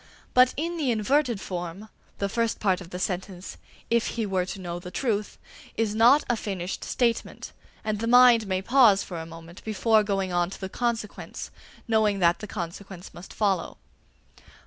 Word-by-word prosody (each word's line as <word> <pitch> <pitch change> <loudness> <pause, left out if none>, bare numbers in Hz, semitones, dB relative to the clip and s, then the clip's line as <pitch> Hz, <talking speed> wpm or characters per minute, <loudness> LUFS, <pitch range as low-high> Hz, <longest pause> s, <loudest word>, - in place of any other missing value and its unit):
But 255 0 +5
in 340 +3 -2
the 290 -5 0
inverted 240 +1 +1
form, 180 +2 -6 0.3
the 200 - -1
first 230 +3 -1
part 190 -3 +1
of 175 - -10
the 180 - -6
sentence 185 0 -4 0.3
"if 235 0 +2
he 225 - 0
were 185 -2 -1
to 195 - -6
know 175 -1 -5
the 180 0 -9
truth" 210 -1 -2 0.4
is 225 -2 0
not 240 +7 +5
a 240 - +1
finished 190 -4 -4
statement, 235 -2 -1 0.3
and 215 -1 -2
the 230 - -2
mind 245 -2 +6
may 190 0 -1
pause 230 -5 +5
for 175 -3 -6
a 160 - -7
moment 165 +2 -12
before 220 +1 +3
going 195 -3 -1
on 175 0 +1
to - - -9
the 190 - -5
consequence, 230 -2 -4 0.4
knowing 220 -3 +2
that 175 -1 +3
the 210 - -7
consequence 185 -1 -7
must 175 - -11
follow. 195 -4 -1
205 Hz, 175 wpm, -26 LUFS, 185-230 Hz, 0.4 s, mind